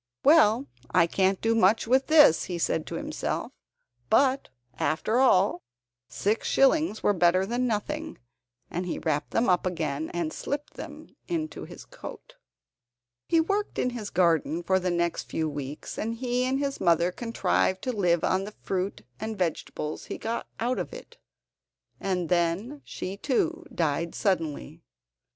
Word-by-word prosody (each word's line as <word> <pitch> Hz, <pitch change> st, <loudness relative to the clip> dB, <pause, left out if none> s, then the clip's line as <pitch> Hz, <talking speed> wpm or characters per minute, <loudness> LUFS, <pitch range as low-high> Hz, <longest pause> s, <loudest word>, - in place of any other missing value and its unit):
"Well, 275 Hz, -5 st, +5 dB, 0.2 s
I 170 Hz, -, +4 dB
can't 190 Hz, +2 st, +1 dB
do 225 Hz, 0 st, +2 dB
much 220 Hz, -1 st, +4 dB
with 260 Hz, +3 st, +3 dB
this," 300 Hz, -, +6 dB
he 180 Hz, -2 st, -4 dB
said 160 Hz, -1 st, -1 dB
to -, -, -5 dB
himself; -, -, -3 dB, 0.6 s
but, 270 Hz, 0 st, +3 dB, 0.3 s
after 170 Hz, -, +1 dB
all, 195 Hz, -8 st, +4 dB, 0.5 s
six 210 Hz, +3 st, -1 dB
shillings 275 Hz, -3 st, +3 dB
were 205 Hz, -, +4 dB
better 180 Hz, +1 st, +3 dB
than 240 Hz, +4 st, 0 dB
nothing, 300 Hz, +9 st, -3 dB, 0.5 s
and 180 Hz, +2 st, -3 dB
he -, -, -2 dB
wrapped 155 Hz, -2 st, -1 dB
them 235 Hz, -, +1 dB
up 180 Hz, -1 st, +3 dB
again 160 Hz, -4 st, -2 dB
and 170 Hz, -2 st, -3 dB
slipped 290 Hz, +1 st, -4 dB
them -, -, -10 dB
into 320 Hz, -2 st, -3 dB
his -, -, -11 dB
coat. -, -, -11 dB, 0.9 s
He 330 Hz, -, +3 dB
worked 400 Hz, +5 st, -1 dB
in 250 Hz, -, +1 dB
his 220 Hz, -4 st, -5 dB
garden 170 Hz, -1 st, +2 dB
for 190 Hz, +2 st, +2 dB
the 185 Hz, 0 st, -1 dB
next 170 Hz, -1 st, -1 dB
few 160 Hz, -1 st, -1 dB
weeks, 145 Hz, -1 st, -6 dB
and 230 Hz, +2 st, -2 dB
he 250 Hz, +1 st, 0 dB
and 260 Hz, +1 st, +1 dB
his 280 Hz, 0 st, -2 dB
mother 170 Hz, +1 st, +3 dB
contrived 185 Hz, -, 0 dB
to 255 Hz, -, 0 dB
live 175 Hz, -7 st, +1 dB
on 190 Hz, +1 st, +1 dB
the 210 Hz, -, -8 dB
fruit 185 Hz, -, -2 dB, 0.2 s
and 220 Hz, -1 st, -4 dB
vegetables 160 Hz, -3 st, -3 dB
he -, -, -5 dB
got 230 Hz, +1 st, -3 dB
out 245 Hz, +3 st, 0 dB
of -, -, -4 dB
it, 485 Hz, 0 st, -11 dB, 0.8 s
and 180 Hz, -3 st, -1 dB
then 180 Hz, -, 0 dB
she 190 Hz, +2 st, -6 dB
too 240 Hz, -, -1 dB
died 165 Hz, +1 st, -1 dB
suddenly. 165 Hz, -, -1 dB
195 Hz, 155 wpm, -27 LUFS, 170-255 Hz, 0.9 s, this